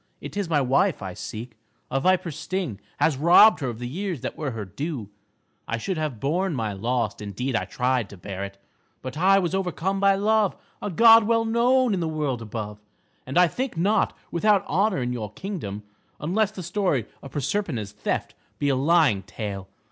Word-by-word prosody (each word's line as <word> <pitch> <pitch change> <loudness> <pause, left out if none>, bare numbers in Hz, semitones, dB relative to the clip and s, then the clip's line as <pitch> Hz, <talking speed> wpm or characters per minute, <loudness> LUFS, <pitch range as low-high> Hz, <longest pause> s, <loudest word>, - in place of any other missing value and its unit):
It - - -8
is 200 -4 -2
my 150 -3 +3
wife 140 - +2
I 95 -1 -5
seek. 110 +4 -8 0.3
A 135 - +1
viper's 180 0 +1
sting 160 - -3 0.2
has 150 -5 +2
robbed 175 +9 +7
her 135 -4 -2
of 115 - -6
the 120 +1 -5
years 175 - -4
that - - -4
were 150 -3 -3
her 110 -4 -5
due. 130 - -5 0.6
I 115 - -1
should 180 - -3
have 150 -8 -3
borne 170 - 0
my 110 -4 -2
loss, 115 +1 -1
indeed 110 +6 -3
I - - 0
tried 125 -4 0
to 100 - -11
bear 95 +2 -6
it, 100 0 -7 0.5
but 130 +1 -6
I 190 +5 +5
was 180 -2 0
overcome 190 0 -1
by 195 0 +4
Love, 210 0 +2 0.3
a - - -2
god 225 +4 +7
well 230 0 +2
known 240 +1 +3
in 190 - 0
the 165 - -1
world 150 -6 -2
above, 105 -1 -6 0.5
and 135 - -2
I 180 0 +7
think 250 +2 -4
not 205 +6 +2
without 200 +3 +3
honor 190 - +1
in 125 0 -2
your 110 -4 -5
kingdom, 110 - -5 0.4
unless 195 +8 +1
the 200 -3 -8
story 175 - 0 0.2
of 140 - -9
Proserpina's 140 - -2
theft 105 - -3 0.2
be 145 - 0
a 135 - +3
lying 145 - +3
tale. 100 -1 -6
150 Hz, 195 wpm, -25 LUFS, 115-195 Hz, 0.6 s, robbed